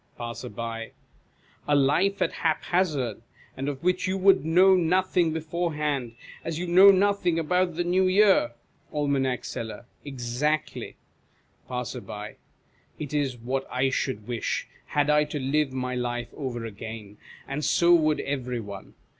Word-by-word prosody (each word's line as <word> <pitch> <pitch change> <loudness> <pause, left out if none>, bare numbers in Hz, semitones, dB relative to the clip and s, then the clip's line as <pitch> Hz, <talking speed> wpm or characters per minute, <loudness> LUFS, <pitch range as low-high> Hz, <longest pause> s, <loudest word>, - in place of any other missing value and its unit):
Passer. 120 +1 -6 1.2
A 145 - +3
life 150 +9 +3
at - - -1
hap 160 -2 0
hazard, 145 - 0 0.3
and 135 +2 -3
of 140 0 -6
which 180 +1 +1
you 190 +1 0
would 195 0 +4
know 185 +4 +5
nothing 180 -1 +2
beforehand, 150 -6 -2 0.3
as 165 -1 -3
you 175 - -3
know 185 +3 +8
nothing 195 -3 +3
about 175 +1 +1
the 175 - 0
New 185 +2 +2
Year? 190 - +4 0.4
Aim. 140 -3 0
Seller. 110 0 -6 0.2
Exactly. 135 +3 -2 0.7
Passer. 115 -4 -5 0.6
It 150 -1 -6
is 140 -4 0
what 130 +3 -3
I 130 +1 +1
should 110 -6 -2
wish, 120 -2 -2 0.2
had 145 0 +1
I 150 0 +4
to 150 0 -4
live 140 +1 +1
my 125 -1 -3
life 120 -1 -3
over 120 -5 -4
again, 110 -1 -8 0.3
and 145 +2 -3
so 170 +3 +4
would 155 -3 +3
every 125 -3 -3
one. 100 -3 -9
145 Hz, 140 wpm, -26 LUFS, 125-175 Hz, 1.2 s, know